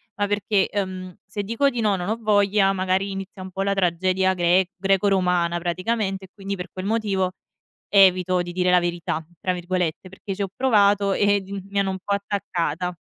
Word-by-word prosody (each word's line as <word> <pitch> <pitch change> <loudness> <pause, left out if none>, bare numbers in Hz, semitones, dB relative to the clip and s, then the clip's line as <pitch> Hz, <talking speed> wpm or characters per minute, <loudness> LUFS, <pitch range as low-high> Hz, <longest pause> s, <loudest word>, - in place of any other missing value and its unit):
Ma 205 0 0
perché, 205 -1 +1
ehm, 185 -2 -4
se 205 - -5
dico 230 +7 +1
di 245 -3 -3
no, 210 -3 +2
non 180 0 -4
ho 220 - 0
voglia, 205 -2 +3
magari 190 +1 0
inizia 195 0 -7
un 185 0 -8
po' 195 +2 -2
la 200 0 +1
tragedia 185 0 +1
gre 180 +1 +2
greco-romana 185 -3 +2
praticamente 190 +3 -2
e - - -19
quindi 200 -1 -5
per 180 -1 -7
quel 185 0 -6
motivo 200 -4 0 0.6
"evito 185 -2 +5
di 175 0 -4
dire 180 0 +1
la 180 0 +5
verità" 170 -2 -2 0.2
tra 185 - 0
virgolette, 180 -1 -2
perché 190 +1 -7
ci 195 - -11
ho 195 - -1
provato, 205 -5 +3
eh 205 0 +2
di 195 - -11 0.2
mi 200 0 -2
hanno 195 -1 +1
un 190 - -4
po' 200 - 0
attaccata. 180 -4 -2
190 Hz, 195 wpm, -23 LUFS, 180-200 Hz, 0.6 s, evito